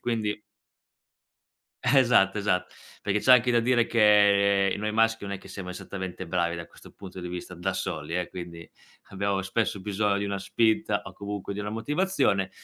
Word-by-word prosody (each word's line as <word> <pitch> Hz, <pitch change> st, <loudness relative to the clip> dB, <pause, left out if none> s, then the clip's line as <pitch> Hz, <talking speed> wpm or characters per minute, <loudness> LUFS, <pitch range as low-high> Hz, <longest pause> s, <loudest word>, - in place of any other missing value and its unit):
quindi 110 Hz, -3 st, -2 dB, 1.4 s
Esatto, 120 Hz, -7 st, +4 dB
esatt 100 Hz, -3 st, 0 dB, 0.4 s
perché 105 Hz, +1 st, 0 dB
c'è 130 Hz, -, +6 dB
anche 125 Hz, 0 st, +5 dB
da 120 Hz, -, +4 dB
dire 120 Hz, 0 st, +2 dB
che 100 Hz, -3 st, +4 dB
noi 105 Hz, +1 st, -3 dB
maschi 115 Hz, 0 st, +2 dB
non 100 Hz, -, -5 dB
è 100 Hz, -, -4 dB
che -, -, -15 dB
siamo 95 Hz, -2 st, -7 dB
esattamente 95 Hz, 0 st, -6 dB
bravi 85 Hz, 0 st, 0 dB
da 85 Hz, -1 st, -7 dB
questo -, -, -17 dB
punto 95 Hz, -2 st, -11 dB
di 90 Hz, -, -6 dB
vista 90 Hz, 0 st, -7 dB
da 90 Hz, +2 st, -2 dB
soli, 85 Hz, -3 st, -3 dB
eh, 90 Hz, -, -3 dB
quindi 85 Hz, -2 st, -9 dB, 0.4 s
abbiamo 100 Hz, 0 st, -1 dB
spesso 100 Hz, +1 st, -1 dB
bisogno 100 Hz, +1 st, 0 dB
di 100 Hz, -, -2 dB
una 100 Hz, -1 st, -3 dB
spinta 110 Hz, +3 st, +1 dB
o -, -, -10 dB
comunque 100 Hz, -1 st, -5 dB
di -, -, -7 dB
una 105 Hz, 0 st, -4 dB
motivazione, 130 Hz, -, 0 dB
100 Hz, 175 wpm, -26 LUFS, 95-110 Hz, 1.4 s, c'è